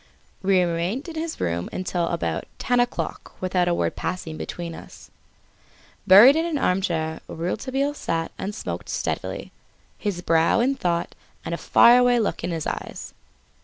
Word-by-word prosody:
We 195 Hz, -1 st, +3 dB
remained 175 Hz, -, -2 dB
in -, -, -7 dB
his 320 Hz, 0 st, -4 dB
room 85 Hz, 0 st, -2 dB
until 180 Hz, -2 st, -2 dB
about 80 Hz, -, -2 dB
ten 245 Hz, 0 st, +1 dB
o'clock 245 Hz, 0 st, -2 dB
without 180 Hz, -1 st, 0 dB
a 175 Hz, -, +2 dB
word -, -, -1 dB
passing 165 Hz, -3 st, -4 dB
between 170 Hz, +1 st, -6 dB
us. -, -, -13 dB, 1.0 s
Buried 215 Hz, +9 st, +9 dB
in 325 Hz, -, +1 dB
an 335 Hz, -3 st, -1 dB
armchair 170 Hz, -, 0 dB
Rouletabille 260 Hz, -, -2 dB
sat 165 Hz, -, -3 dB
and 205 Hz, +2 st, -5 dB
smoked -, -, -5 dB
steadily, -, -, -3 dB, 0.5 s
his 190 Hz, -4 st, -3 dB
brow 165 Hz, +4 st, +3 dB
in 255 Hz, +4 st, +2 dB
thought 175 Hz, -10 st, -1 dB, 0.3 s
and -, -, -3 dB
a -, -, -1 dB
far 240 Hz, +1 st, +6 dB
away 245 Hz, -1 st, +4 dB
look 215 Hz, -, -1 dB
in 175 Hz, -, -2 dB
his 165 Hz, -3 st, -3 dB
eyes. -, -, -5 dB
185 Hz, 160 wpm, -24 LUFS, 170-245 Hz, 1.0 s, Buried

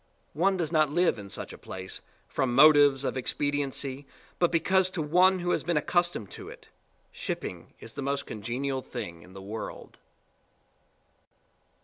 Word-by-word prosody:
One 190 Hz, +5 st, +2 dB
does 165 Hz, -3 st, -1 dB
not 155 Hz, -3 st, +3 dB
live 170 Hz, -6 st, +2 dB
in 100 Hz, -1 st, -9 dB
such -, -, -5 dB
a -, -, -11 dB
place 95 Hz, 0 st, -7 dB, 0.3 s
from 125 Hz, -2 st, -1 dB
motives 145 Hz, -1 st, +7 dB
of 135 Hz, -, -1 dB
expediency 140 Hz, 0 st, -2 dB, 0.3 s
but 175 Hz, -, +3 dB
because 185 Hz, +3 st, +3 dB
to 180 Hz, -3 st, -3 dB
one 180 Hz, +5 st, +4 dB
who 175 Hz, 0 st, -1 dB
has -, -, +1 dB
been 170 Hz, -1 st, 0 dB
accustomed 175 Hz, -, 0 dB
to -, -, -9 dB
it, -, -, -13 dB, 0.4 s
shipping -, -, -6 dB
is 115 Hz, -, -10 dB
the 145 Hz, -, -5 dB
most 140 Hz, +1 st, -1 dB
congenial 130 Hz, +5 st, -3 dB
thing 85 Hz, -8 st, -7 dB
in 90 Hz, -, -15 dB
the 95 Hz, 0 st, -9 dB
world. 110 Hz, +3 st, -7 dB
145 Hz, 155 wpm, -28 LUFS, 125-175 Hz, 0.4 s, motives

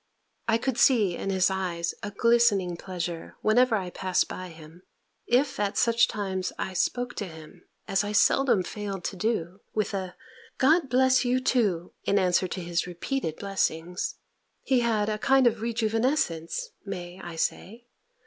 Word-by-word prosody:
I 225 Hz, 0 st, +3 dB
could 250 Hz, +1 st, -2 dB
see 210 Hz, -9 st, +4 dB
in 195 Hz, -, -4 dB
his 190 Hz, 0 st, +2 dB
eyes 175 Hz, -3 st, -2 dB
a 205 Hz, -, -4 dB
glistening 205 Hz, -4 st, +3 dB
pleasure, 175 Hz, -2 st, -5 dB
whenever 235 Hz, +2 st, +4 dB
I 185 Hz, -4 st, -3 dB
passed 185 Hz, -1 st, 0 dB
by 185 Hz, -, -6 dB
him: 160 Hz, +1 st, -14 dB, 0.5 s
if 255 Hz, +1 st, +2 dB
at 205 Hz, -1 st, -1 dB
such 235 Hz, 0 st, +4 dB
times 190 Hz, -3 st, -3 dB
I 190 Hz, -, -3 dB
spoke 245 Hz, +7 st, -1 dB
to 205 Hz, -, -3 dB
him, 160 Hz, +2 st, -13 dB, 0.2 s
as 195 Hz, +1 st, +1 dB
I 205 Hz, -, -3 dB
seldom 215 Hz, -1 st, +3 dB
failed 195 Hz, -1 st, -5 dB
to 195 Hz, -, -3 dB
do, 190 Hz, -2 st, -2 dB, 0.2 s
with 215 Hz, -2 st, 0 dB
a 190 Hz, -2 st, -4 dB, 0.4 s
"God 300 Hz, +2 st, +3 dB
bless 260 Hz, +1 st, +4 dB
you 250 Hz, +1 st, +2 dB
too!" 205 Hz, -10 st, 0 dB
in 200 Hz, -, +2 dB
answer 185 Hz, -1 st, +2 dB
to 185 Hz, -, -5 dB
his 170 Hz, 0 st, -1 dB
repeated 180 Hz, -, -3 dB
blessings, 180 Hz, -3 st, -2 dB, 0.5 s
he 260 Hz, -2 st, +2 dB
had 225 Hz, -3 st, +1 dB
a 215 Hz, 0 st, -2 dB
kind 265 Hz, +2 st, +4 dB
of 235 Hz, -1 st, +3 dB
rejuvenescence 225 Hz, -, 0 dB, 0.2 s
(may 180 Hz, -2 st, -7 dB
I 175 Hz, -1 st, -7 dB
say?) 225 Hz, +8 st, -3 dB
200 Hz, 160 wpm, -27 LUFS, 180-235 Hz, 0.5 s, see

